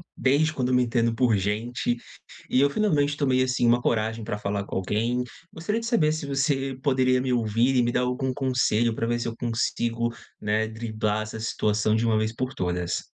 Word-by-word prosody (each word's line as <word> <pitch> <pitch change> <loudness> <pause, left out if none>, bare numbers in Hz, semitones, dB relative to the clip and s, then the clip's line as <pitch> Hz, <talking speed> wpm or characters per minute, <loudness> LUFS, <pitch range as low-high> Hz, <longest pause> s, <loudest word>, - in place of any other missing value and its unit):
desde 150 +4 +2
quando 125 -2 0
me 125 - +4
entendo 115 -1 +1
por 115 -3 +3
gente, 115 +5 -1 0.5
e 130 - +3
eu 140 - +4
finalmente 145 -6 +1
tomei, 130 -3 +2
assim, 125 -1 +1
uma 120 +1 +4
coragem 110 -1 0
pra 105 - -3
falar 100 -1 -2
com - - -7
alguém. 115 +6 0 0.3
Gostaria 210 +8 -2
de 230 - -4
saber 165 -11 +3
se 155 -2 -4
você 135 -1 0
poderia 130 -2 +3
me 130 -1 0
ouvir 120 +3 +2
e 125 - +4
me 120 - +1
dar 125 - +1
algum 125 +1 -1
conselho 120 -4 +1
para 115 - -1
ver 120 0 0
se 120 - -3
eu 115 - -4
consigo, 115 0 -1 0.3
né, 110 +1 +1
driblar 110 -1 -2
essa 110 +1 -7
situação 110 -1 0
de 110 +1 +1
uma 110 -1 +2
vez 110 +1 0
por 130 +1 -3
todas. 90 -3 -2
120 Hz, 200 wpm, -25 LUFS, 110-130 Hz, 0.5 s, me